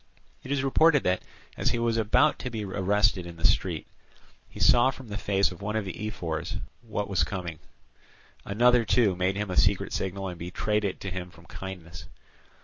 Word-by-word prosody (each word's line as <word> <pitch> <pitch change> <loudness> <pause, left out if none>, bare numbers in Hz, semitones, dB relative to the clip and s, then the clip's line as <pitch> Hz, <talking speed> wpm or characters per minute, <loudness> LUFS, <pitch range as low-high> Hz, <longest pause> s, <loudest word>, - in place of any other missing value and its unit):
It 130 - -8
is 140 -2 +1
reported 145 +2 +4
that, 90 0 +1 0.3
as - - +1
he - - 0
was 115 -1 +1
about 115 +7 +3
to 125 - -4
be 110 -3 -4
arrested 100 -1 +1
in 85 - -9
the 80 - -2
street, - - +1 0.6
he - - -11
saw 120 +1 +6
from 130 -3 -8
the 100 - -4
face 100 -2 +2
of 90 - -11
one 105 +2 -3
of 110 -2 0
the 105 +3 -4
ephors 85 -5 -4 0.2
what 105 -3 -3
he - - -14
was 95 - +2
coming 85 -6 -4
for; - - -24
another, 120 +3 +4
too, 110 -2 +3
made 90 +2 0
him 105 -1 -3
a - - -2
secret 100 -1 +2
signal, 95 +1 -2
and 90 -2 -7
betrayed 105 +5 -1
it 95 - -2
to 95 - -4
him 90 0 -5
from 85 -1 -17
kindness. 90 -2 -8
100 Hz, 205 wpm, -27 LUFS, 90-110 Hz, 0.6 s, saw